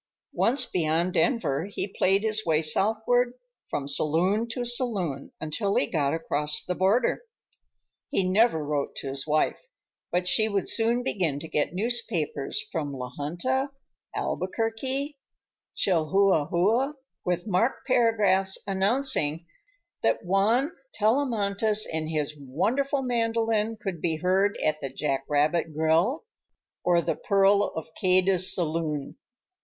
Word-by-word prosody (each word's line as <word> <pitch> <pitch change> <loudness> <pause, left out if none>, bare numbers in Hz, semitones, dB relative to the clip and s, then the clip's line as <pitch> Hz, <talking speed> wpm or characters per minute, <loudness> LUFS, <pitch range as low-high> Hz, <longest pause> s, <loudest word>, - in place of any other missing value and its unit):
Once 255 +5 +2
beyond 170 +1 0
Denver, 170 - +1
he 200 0 -4
played 195 +1 +1
his 220 0 0
way 160 -1 +1
southward 220 +9 +1 0.3
from 140 -1 -3
saloon 175 +10 +1
to 240 +1 -3
saloon 205 - 0
until 195 +6 -2
he - - +3
got 140 -1 0
across 150 -2 -1
the 180 - -1
border. 200 +7 +2 0.9
He 275 -10 +1
never 185 -5 +3
wrote 145 -1 -2
to 135 - -5
his 135 +2 -5
wife; 155 - 0 0.4
but 180 +1 0
she 215 +4 +4
would 200 -2 -1
soon 235 +2 +1
begin 175 - -1
to 160 - -7
get 150 +2 -1
newspapers 205 - -1
from 150 -5 -3
La 125 -2 -6
Junta, 255 - -1 0.5
Albuquerque, 260 +8 -2 0.6
Chihuahua, 195 - +2 0.3
with 180 0 -1
marked 220 +5 0
paragraphs 210 -6 +2
announcing 195 - +1 0.6
that - - 0
Juan 220 - +2 0.2
Tellamantez 215 -3 +1
and 160 -1 -3
his 150 -2 -2
wonderful 245 - -1
mandolin 225 -2 0
could 185 -7 -5
be 165 -2 0
heard 190 +4 +1
at 155 0 0
the 135 - -3
Jack 135 0 -2
Rabbit 155 +2 +1
Grill, 160 - +2 0.6
or 175 -1 +3
the - - 0
Pearl 200 0 +3
of 160 - -5
Cadiz 185 0 +3
Saloon. 155 -4 -2
190 Hz, 125 wpm, -26 LUFS, 155-225 Hz, 0.9 s, she